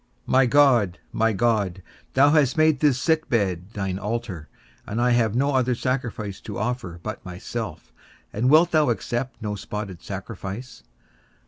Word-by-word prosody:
My 130 0 +4
God, 120 -9 +4
my 115 0 +2
God, 100 -4 0 0.3
thou 140 +2 +6
hast 145 -4 +3
made 155 -3 +4
this 140 -4 +3
sick 160 +1 +1
bed 95 -6 0
thine 95 -2 -3
altar, 105 -6 -4 0.4
and 110 - -3
I 125 +1 +3
have 115 -2 +2
no 140 +3 +2
other 130 -1 +2
sacrifice 115 -6 -3
to 105 - -7
offer 110 -6 -3
but 110 - -6
myself; 95 +1 -6 0.4
and 120 +5 +1
wilt 165 +4 +6
thou 155 -3 +3
accept 120 +4 -2
no 105 -1 -2
spotted 105 -3 -6
sacrifice? 100 +4 -7
115 Hz, 150 wpm, -24 LUFS, 100-130 Hz, 0.4 s, thou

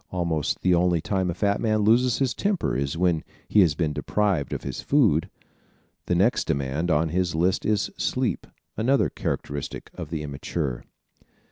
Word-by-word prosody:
Almost 85 -5 -1
the 90 - +4
only 90 0 +3
time 95 +2 -1
a 85 - -2
fat 100 -1 0
man 110 -1 +1
loses 120 +3 +4
his 130 -3 +1
temper 200 - -1
is 70 +3 -2
when 85 -2 +1 0.2
he 105 - +3
has 80 -6 +3
been 80 -2 -1
deprived 95 -6 0
of - - -4
his - - -5
food. 110 - +2 0.8
The - - +1
next - - +2
demand 70 +5 -1
on 80 0 +2
his 90 0 0
list 90 +3 +1
is 105 -2 +1
sleep, - - -1 0.3
another 110 - +2
characteristic 70 0 -4
of - - -7
the 80 -2 -3
immature. 70 -2 -4
90 Hz, 165 wpm, -25 LUFS, 75-105 Hz, 0.8 s, the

